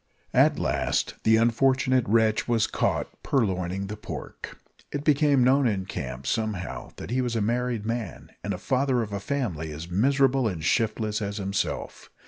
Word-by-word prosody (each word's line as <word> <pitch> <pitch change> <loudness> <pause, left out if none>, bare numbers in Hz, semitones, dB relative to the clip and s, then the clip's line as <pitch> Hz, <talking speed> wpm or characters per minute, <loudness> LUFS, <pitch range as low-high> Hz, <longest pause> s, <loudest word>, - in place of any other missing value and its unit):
At - - +4
last - - 0
the 110 0 +4
unfortunate 130 +2 +2
wretch 110 -1 +3
was 115 -3 +2
caught - - -2
purloining 95 -6 0
the 105 +2 -5
pork. - - -8 0.3
It 145 -1 -3
became 145 -3 +4
known 130 +1 +4
in 100 -4 0
the - - -8
camp, 65 -7 -6
somehow, 110 - -2
that - - -8
he 130 +1 +1
was 120 -2 -2
a - - +1
married 120 0 -1
man, 115 -4 -4
and 100 -3 -3
father 130 +2 +1
of 105 -2 -7
a 100 - -2
family 100 - -3
as 80 +4 -8
miserable 135 +4 +3
and 85 -7 -4
shiftless 110 +2 0
as 100 0 -3
himself. 100 -1 -3
110 Hz, 165 wpm, -26 LUFS, 100-130 Hz, 0.3 s, At